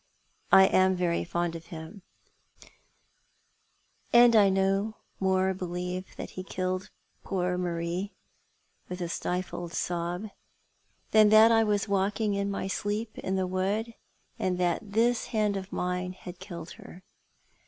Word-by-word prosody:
" - - -42
I 190 - +9
am 185 0 +3
very 175 -2 0
fond 175 -1 -2
of 165 0 -9
him, 165 +4 -9 2.1
and 240 -1 +7
I 205 -2 +6
no 195 +3 +1 0.2
more 190 0 +2
believe 180 0 -5
that - - -7
he 185 - -6
killed 185 0 -3 0.3
poor 180 -1 -1
Marie 175 +2 -3 0.2
" - - -43
— - - -41
with 180 0 -5
a 175 - -2
stifled 175 0 -4
sob 175 +4 -2 0.3
— - - -43
" - - -40
than 215 -1 +6
that 220 +2 +7
I 225 0 +5
was 210 -1 0
walking 200 +2 0
iu 200 0 -1
my 200 -1 -3
sleep 210 +3 -3
in 190 - -2
the 190 -1 0
wood, 195 +5 -1 0.5
and 185 -1 0
that 180 +3 -1
this 235 +2 +2
hand 210 -3 0
of 195 0 -5
mine 180 0 -2 0.2
killed 170 -3 -8
her. 185 - -13
190 Hz, 150 wpm, -28 LUFS, 180-205 Hz, 2.1 s, I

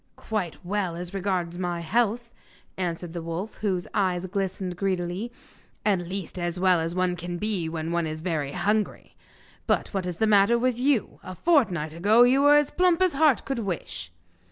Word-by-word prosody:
'Quite 195 -7 -4
well 190 -2 -1
as 175 +2 -6
regards 180 -3 -2
my 175 -2 -2
health,' 235 +5 0 0.4
answered 175 -2 -3
the 170 - -4
wolf, 170 +6 -5
whose 185 -4 -1
eye 190 -4 +1
glistened 185 0 -3
greedily, 185 +3 -2 0.5
'at 200 -3 +3
least, 185 +1 -5
as 175 0 -2
well 185 -2 +4
as 165 +1 -2
one 185 -1 +1
can 175 0 -5
be 190 -4 -1
when 160 0 -4
one 170 -1 0
is 155 0 -5
very 155 -5 -2
hungry. 205 +4 -1 0.5
But - - +1
what 190 -2 -2
is 180 - -3
the 220 - +1
matter 210 +2 +5
with 245 0 0
you? 260 -4 +1
A 185 - -8
fortnight 185 - +2
ago 210 +8 +5
you 260 +3 +4
were 290 +1 +7
as 295 -1 +3
plump 360 -2 +3
as 370 -2 +3
heart 295 -2 +3
could 270 -3 -2
wish! 175 - -4
185 Hz, 180 wpm, -26 LUFS, 175-220 Hz, 0.5 s, were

